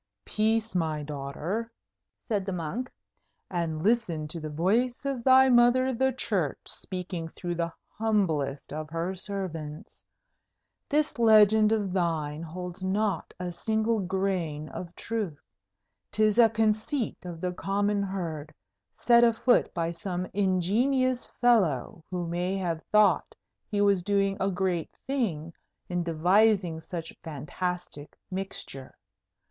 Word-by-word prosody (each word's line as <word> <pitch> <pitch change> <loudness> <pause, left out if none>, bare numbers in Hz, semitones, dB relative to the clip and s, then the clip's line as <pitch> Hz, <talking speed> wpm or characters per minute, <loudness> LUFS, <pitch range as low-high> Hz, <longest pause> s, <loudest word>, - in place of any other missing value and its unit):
"Peace, 220 +1 +1
my 155 -4 0
daughter," 150 +10 -4 0.6
said 210 -4 0
the 195 - -4
monk; 180 +9 -3 0.6
"and 165 -3 -2
listen 200 -8 +1
to 165 - -5
the 155 -1 -5
voice 220 - +1
of 270 -4 -2
thy 265 +1 +7
mother 255 +1 +5
the 265 +2 +2
Church 195 - -1
speaking 180 -3 -4
through 175 +2 -5
the 170 0 -2 0.3
humblest 160 -12 0
of 155 0 -5
her 165 +3 -2
servants. 175 -6 -6 0.9
This 295 -3 +1
legend 215 -1 +6
of 205 -4 0
thine 160 -4 -1
holds 180 +2 -6
not 195 -1 0
a 180 -1 -3
single 220 +4 0
grain 180 -6 -2
of 175 -1 -8
truth. 210 -10 -3 0.7
'Tis 215 +1 +2
a 230 -1 +8
conceit 220 +4 0
of 175 -2 -7
the 180 +1 -1
common 200 +2 0
herd, 170 -6 -4 0.5
set 235 -1 +6
afoot 235 +1 +3
by 170 -1 -1
some 180 +1 -4
ingenious 225 +8 +1
fellow 180 - +2
who 180 -1 -3
may 175 +3 -1
have 170 -4 -2
thought 210 -1 +4 0.3
he 205 -1 0
was 200 -2 +4
doing 195 +1 +1
a 195 - +1
great 180 -3 -1 0.2
thing 180 - -2 0.4
in 180 -1 0
devising 175 +1 +3
such 165 0 -6
fantastic 160 +1 -5
mixture. 185 -8 -6
190 Hz, 125 wpm, -28 LUFS, 165-220 Hz, 0.9 s, a